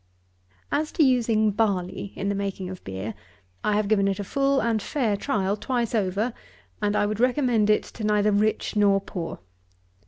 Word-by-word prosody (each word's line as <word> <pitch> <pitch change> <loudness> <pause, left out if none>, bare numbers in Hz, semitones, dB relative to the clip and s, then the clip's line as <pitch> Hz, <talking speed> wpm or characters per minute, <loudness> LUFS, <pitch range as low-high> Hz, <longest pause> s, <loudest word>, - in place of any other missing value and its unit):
_) - - -39 0.2
38. 290 - +2
As 310 - -6
to 315 - +3
using 230 -5 +3
barley 200 -2 -1
in 195 - -3
the 200 - +1
making 195 -2 -3
of 185 - -9
beer, 95 +3 -5 0.5
I 210 - +2
have 210 -1 +1
given 200 -2 +3
it 195 -1 0
a - - -2
full 275 +6 +1
and 225 -3 +1
fair 235 -6 0
trial 200 -3 0
twice 240 +1 -2
over, 210 +2 0 0.5
and 205 0 +1
I 205 - +3
would 210 +1 -2
recommend 245 -4 +2
it 210 - +4
to 225 - -9
neither 210 0 +3
rich 215 +2 +1
nor 200 -1 +4
poor. 175 -4 -6
210 Hz, 190 wpm, -25 LUFS, 195-235 Hz, 0.5 s, it